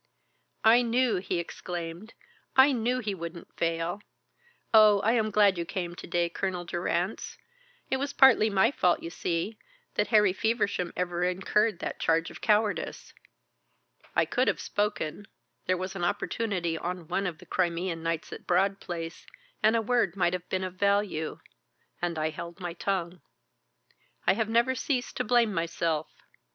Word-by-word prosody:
"I 230 +2 +7
knew," 240 -2 +2
he 180 0 -2
exclaimed, 170 +3 -6 0.4
"I 265 +2 +7
knew 245 0 0
he 210 -3 -2
wouldn't 170 -1 -8
fail. 165 +3 -1 0.7
Oh, 215 -2 +7
I 220 - +3
am 225 -2 +2
glad 205 -3 +4
you - - 0
came 175 0 -4
to - - -10
day, 175 0 +1
Colonel 180 0 -3
Durrance. 175 +3 -2 0.5
It 265 - +2
was 280 +1 -2
partly 255 -6 +6
my 200 +4 +3
fault, 180 -10 +1
you 165 - -5
see, 175 +6 -2 0.3
that - - +1
Harry 210 -4 +4
Feversham 205 -4 0
ever 175 -1 -1
incurred 195 +3 +1
that - - -4
charge 165 0 +1
of - - -12
cowardice. 210 -1 0 1.0
I - - +4
could - - 0
have - - +1
spoken 205 -3 -2 0.4
there 185 0 +2
was 185 +1 -5
an 175 - -4
opportunity 180 -3 -1
on 180 -2 -4
one 195 +3 -1
of 170 -3 -5
the - - -15
Crimean 175 -1 -1
nights 165 -1 -3
at - - -10
Broad 195 +2 +2
Place, 165 -1 -6 0.3
and 220 +1 +4
a 225 - +1
word 220 -6 +1
might 175 -2 +1
have 180 -1 -5
been 190 0 -1
of 185 0 -5
value 200 -5 0 0.6
and 175 -2 -1
I 155 0 0
held 170 +3 -8
my 175 -2 -4
tongue. 180 -1 -2 1.0
I - - +5
have 220 +1 -1
never 235 +3 +3
ceased 255 0 -2
to 250 - 0
blame 235 -2 +3
myself. 165 -2 -1
185 Hz, 165 wpm, -28 LUFS, 170-215 Hz, 1.0 s, I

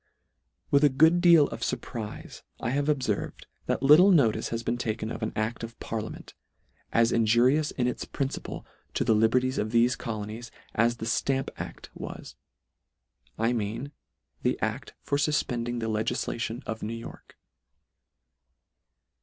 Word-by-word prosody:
With 140 +1 +5
a 145 - +7
good 160 +6 +4
deal 170 -5 +7
of - - -7
furprife 110 -4 -5 0.2
I 120 - -2
have 145 +2 0
ob 145 -3 +2
ferved, 105 -5 -2 0.2
that - - -1
little 155 +8 +8
notice 115 - +3
has 115 0 -3
been 120 +1 -1
taken 110 -1 -2
of - - -6
an 110 - -1
acl: 110 +2 -2
of 115 0 -8
parliament, 110 -1 -6 0.6
as 115 0 +3
injurious 120 +7 +3
in 125 - -1
its 125 - -2
principle 135 -1 -4 0.3
to - - +1
the - - +3
liberties 125 +4 +2
of 105 - -1
thefe 120 +2 +3
colonies, 110 +1 -5 0.2
as 120 +2 +2
the 110 - -5
Stamp 135 +3 0
act - - -8
was: - - -8 1.0
I 115 +2 +1
mean 115 +5 -3 0.5
the - - 0
adt - - -3
for 140 - 0
fuf 150 +1 +1
pending 120 -1 -2
the 115 -1 -2
legislation 110 +2 -2
of 110 0 -5
New 110 +2 -3
York. 115 0 -11
120 Hz, 155 wpm, -27 LUFS, 110-135 Hz, 1.0 s, little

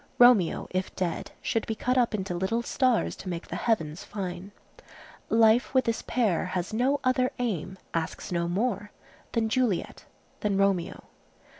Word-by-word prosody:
Romeo, 245 -8 +5
if 185 0 -2
dead, 175 -3 -2
should 225 - -1
be 220 - -2
cut 250 +3 0
up 240 -3 +2
into 190 -3 -3
little 190 +7 -1
stars 255 -2 +1
to 190 - -7
make 170 -1 -5
the - - -5
heavens 180 -8 -1
fine. 190 -1 -5 0.8
Life, 225 +3 +4
with 260 - +4
this 230 -1 0
pair, 225 -8 +1
has 185 +1 -3
no 260 +5 +2
other 255 0 +2
aim, 190 -6 -2 0.2
asks 165 +2 -3
no 170 -1 0
more, 205 +2 -1 0.4
than 230 -2 +1
Juliet,—than 210 -3 -2
Romeo. 195 -3 +1
210 Hz, 150 wpm, -27 LUFS, 185-240 Hz, 0.8 s, Romeo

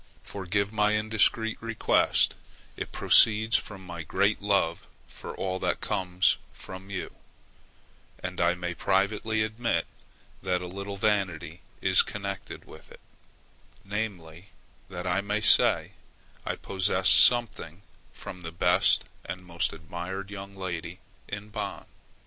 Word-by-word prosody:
Forgive 100 +2 -2
my 105 0 +2
indiscreet 110 +1 +2
request; 115 -1 +2 0.4
it - - -6
proceeds 110 0 +5
from 95 -3 -2
my 85 -2 -7
great 100 +8 +1
love 100 -5 0 0.2
for - - -9
all 95 -1 -3
that - - -1
comes 90 0 +1
from 95 +1 -11
you; 95 -2 -5 1.0
and 90 -1 -5
I 85 +1 +3
may 90 -1 -4
privately 105 +4 0
admit 110 -6 -1 0.6
that 90 -1 0
a - - -5
little 100 +2 -6
vanity 95 -5 -1 0.2
is - - +6
connected 100 -1 -6
with - - -15
it, - - -14 0.9
namely, 95 -4 -5 0.4
that 90 -1 -6
I 90 +2 +1
may 105 +1 -1
say 110 - +4 0.6
I - - -1
possess 95 -1 0
something 105 -7 +4 0.3
from 90 - -10
the 85 -1 -7
best 90 +1 +3 0.2
and 90 0 -7
most 85 -1 -1
admired 90 +5 -7
young 100 -1 -8
lady 90 -2 -5 0.3
in 100 +1 -7
Bonn. 105 -2 -5
95 Hz, 125 wpm, -27 LUFS, 90-105 Hz, 1.0 s, is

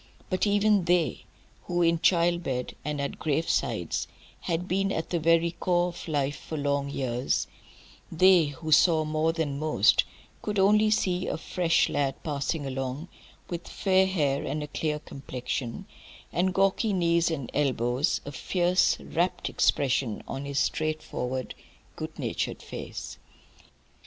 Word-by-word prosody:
But 185 +3 +1
even 205 -2 +3
they, 175 -2 +1 0.4
who 175 0 +1
in 165 0 +3
child 170 0 +3
bed 125 -5 -3
and 150 0 -3
at 140 - -3
gravesides 160 +1 -1 0.3
had 175 +1 -2
been 195 +1 0
at 160 - -3
the 170 - +1
very 165 +1 +3
core 175 +1 +1
of 175 - -9
life 145 -2 -1
for 155 - -6
long 140 -1 0
years, 125 -2 -1 0.7
they, 180 0 +6
who 155 +2 -6
saw 155 +1 +5
more 155 +1 +1
than 155 -4 -2
most, 155 0 +4 0.4
could 210 -1 -3
only 210 +2 +5
see 185 -4 +1
a - - -2
fresh 170 0 +1
lad 140 -2 0
passing 145 0 -2
along, 135 +4 -4 0.4
with 175 -1 -6
fair 190 -1 +2
hair 145 -7 0
and 150 +2 -3
a - - -5
clear 150 +1 -2
complexion, 130 -4 -5 0.5
and 185 +1 +1
gawky 195 +2 +2
knees 170 -2 +2
and 140 -7 -4
elbows, 130 +1 +1
a 145 - -5
fierce, 180 +5 +2
rapt 175 +3 -1
expression 130 -5 +1
on 135 +1 -5
his 140 0 -4
straightforward, 140 -5 -2 0.4
good - - -6
natured - - -3
face. - - -7
160 Hz, 140 wpm, -27 LUFS, 140-180 Hz, 0.7 s, they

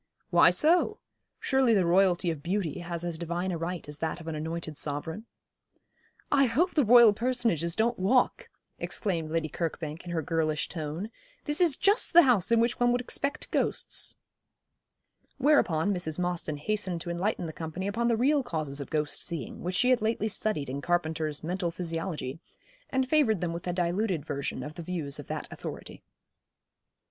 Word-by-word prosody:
'Why - - +7
so? 350 +7 +3 0.4
Surely 265 -4 +3
the 190 -3 +3
Royalty 180 0 +3
of 155 -3 -6
beauty 180 -1 -2
has 170 -1 -5
as 170 -2 -4
divine 175 +2 -2
a 170 - -2
right 170 -1 -4
as 145 0 -6
that 160 +1 -2
of 165 - -11
an 160 - -3
anointed 160 0 -4
sovereign.' 160 +10 -5 1.0
'I 275 -1 +5
hope 320 +11 +1
the 295 - +3
Royal 235 -1 +8
personages 230 - 0
don't 230 0 +1
walk,' 245 +7 +2 0.3
exclaimed 170 -7 -2
Lady 160 0 -1
Kirkbank, 160 0 -4
in 175 - -9
her 165 -2 -1
girlish 155 -1 0
tone; 165 +6 -5 0.3
'this 295 +4 0
is 330 -6 +4
just 405 +1 +2
the 345 +1 +9
house 235 - +3
in 230 - +5
which 235 +1 +1
one 245 0 +4
would 245 - +2
expect 280 +4 -2
ghosts.' - - 0 1.2
Whereupon 205 - +3
Mrs. 165 -4 -2
Mostyn 175 -4 -2
hastened 185 +1 -2
to 175 - -4
enlighten 180 +1 -1
the 160 - -6
company 165 +4 -5
upon 230 +4 0
the 230 -2 +2
real 280 +5 +3
causes 155 - -3
of 140 - -7
ghost 150 -2 -1
seeing, 165 -6 -5
which 180 +1 -3
she 250 +6 +3
had 250 - +3
lately 220 0 0
studied 205 -8 -2
in 135 +2 -4
Carpenter's 160 -3 -1
'Mental 175 +2 -1
Physiology,' 165 -4 -4 0.5
and 265 -1 0
favoured 255 - +3
them 170 -1 -2
with 170 +1 -6
a - - +1
diluted 175 -1 -1
version 140 -2 -3
of 150 +2 -7
the 170 - -8
views 160 -5 -4
of 145 - -9
that - - -4
authority. - - -8
175 Hz, 175 wpm, -28 LUFS, 160-230 Hz, 1.2 s, the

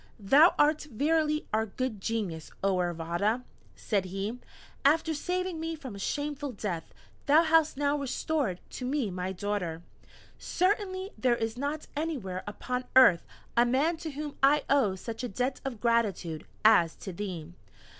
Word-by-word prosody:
"Thou 280 - +6
art 300 +1 +3
verily 305 +4 +1
our 220 +1 +1
Good 220 -1 -3
Genius, 190 -8 -3
oh 195 -1 +2
Iravata!" 175 +7 0 0.3
said 200 -4 -1
he; 195 +6 -4 0.4
"after 320 +3 +3
saving 360 +2 -2
me 325 0 -3
from 265 -7 -8
a 200 - -8
shameful 290 +4 -3
death, 185 -6 -4 0.4
thou 305 +4 +6
hast 320 -3 +3
now 285 0 +1
restored 275 - -1
to - - -6
me 265 -7 0
my 180 +1 -3
daughter! 180 -4 -3 0.6
Certainly 375 +1 0
there 250 -2 +3
is 225 -1 -2
not 285 +4 -3
anywhere 265 - -3
upon 250 +5 -3
earth 255 -10 +7 0.3
a 235 - +6
man 270 +8 +2
to 320 - -5
whom 295 0 -6
I 285 +2 +5
owe 250 -9 +3
such 225 +6 -6
a - - -1
debt 255 +6 -2
of 260 -5 -5
gratitude, 205 -9 0 0.2
as 175 -7 +6
to 190 - -8
thee. 175 -4 -6
250 Hz, 155 wpm, -29 LUFS, 195-300 Hz, 0.6 s, earth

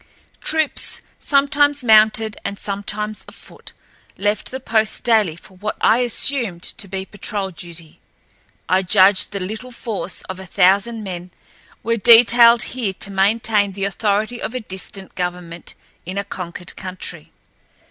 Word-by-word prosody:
Troops, 315 -2 0 0.2
sometimes 285 0 +2
mounted 220 -1 +4
and 200 - -4
sometimes 205 +2 -3
afoot, - - -14 0.5
left 205 0 -1
the 260 - -5
post 220 -4 0
daily 215 -9 +3
for 185 +2 -17
what 210 +3 -4
I 225 +2 +4
assumed 240 -6 0
to 200 - -5
be 190 0 -5
patrol 200 -1 -4
duty. 170 -2 -12 0.7
I 185 +2 +3
judged 190 +1 +4
the 200 - -4
little 220 +7 -6
force 220 -6 -5
of 185 0 -7
a 190 - -9
thousand 200 +5 +2
men 180 -2 -6 0.5
were 230 +1 0
detailed 235 +1 +7
here 235 -6 -2
to 195 - -5
maintain 205 +1 +2
the 195 0 -2
authority 210 +3 -1
of 230 - -4
a - - -1
distant 190 -2 -7
government 175 -2 -5 0.3
in 185 +3 -6
a 200 - 0
conquered 180 -3 -7
country. 180 -3 -8
205 Hz, 140 wpm, -20 LUFS, 190-230 Hz, 0.7 s, detailed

